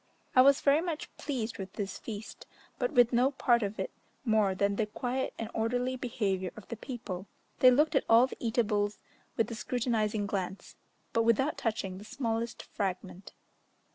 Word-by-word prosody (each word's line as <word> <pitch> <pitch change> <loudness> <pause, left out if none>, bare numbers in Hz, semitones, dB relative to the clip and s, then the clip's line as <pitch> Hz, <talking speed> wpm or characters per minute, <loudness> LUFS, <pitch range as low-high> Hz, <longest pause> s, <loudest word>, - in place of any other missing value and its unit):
I 255 - +9
was 275 +2 +6
very 285 +2 +4
much 335 -3 -4
pleased 240 -7 -3
with 190 -1 -6
this 195 -2 -4
feast, 215 -1 -8 0.3
but 245 -2 +1
with 245 0 +5
no 250 +3 +4
part 240 -3 +2
of 205 0 -3
it - - -3 0.3
more 215 -4 +3
than 200 +1 +1
the 215 +1 0
quiet 250 +4 -2
and 225 - -3
orderly 245 +3 0
behaviour 200 -7 -1
of 215 - -11
the 235 - -3
people: 220 -6 -6 0.3
they 255 - +8
looked 295 +5 +4
at - - +3
all 230 +2 +7
the 260 - -8
eatables 210 -3 0 0.4
with 225 0 +1
a - - -2
scrutinizing 220 -3 0
glance, 190 -1 -4 0.4
but 230 - +3
without 230 +6 +2
touching 195 -5 -2
the - - -10
smallest 230 0 -3
fragment. 190 -1 -4
225 Hz, 170 wpm, -30 LUFS, 205-250 Hz, 0.4 s, I